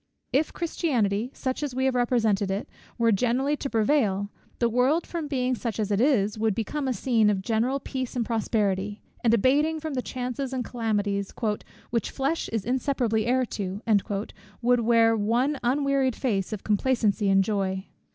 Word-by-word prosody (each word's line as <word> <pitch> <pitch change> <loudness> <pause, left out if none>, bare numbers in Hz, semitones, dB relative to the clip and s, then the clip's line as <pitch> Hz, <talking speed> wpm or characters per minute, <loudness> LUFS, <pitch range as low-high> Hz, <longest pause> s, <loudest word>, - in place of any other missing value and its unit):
If 295 +4 +2
Christianity, 245 - 0
such 260 0 -3
as 285 -4 -3
we 260 0 +1
have 265 - +2
represented 225 -5 +1
it, 195 +2 -2 0.3
were 230 -1 +3
generally 250 +7 +1
to 275 - -4
prevail; 215 -4 +1 0.3
the 235 - +2
world, 255 +8 +2
from 330 -3 -4
being 255 -3 0
such 230 -2 -3
as 210 -1 -1
it 200 +2 +2
is, 215 -6 +2
would 220 -2 +1
become 270 +6 -2
a - - +1
scene 225 -1 +2
of 195 -2 0
general 235 +6 +1
peace 260 -2 -5
and 240 -2 0
prosperity; 205 -3 -1 0.2
and 230 - +4
abating 285 +8 +3
the 305 -4 -3
chances 255 +1 -4
and 250 -2 -2
calamities 205 -4 -1 0.6
"which 230 -3 0
flesh 280 +5 -1
is 225 -3 -2
inseparably 245 -3 0
heir 255 +1 +2
to," 200 -1 -5 0.8
would 245 +1 +4
wear 230 -1 +4
one 240 +7 +1
unwearied 270 0 +1
face 200 -7 -1
of 215 -3 -5
complacency 210 -2 +1
and 195 0 +5
joy. 190 -2 -1
235 Hz, 165 wpm, -26 LUFS, 210-260 Hz, 0.8 s, and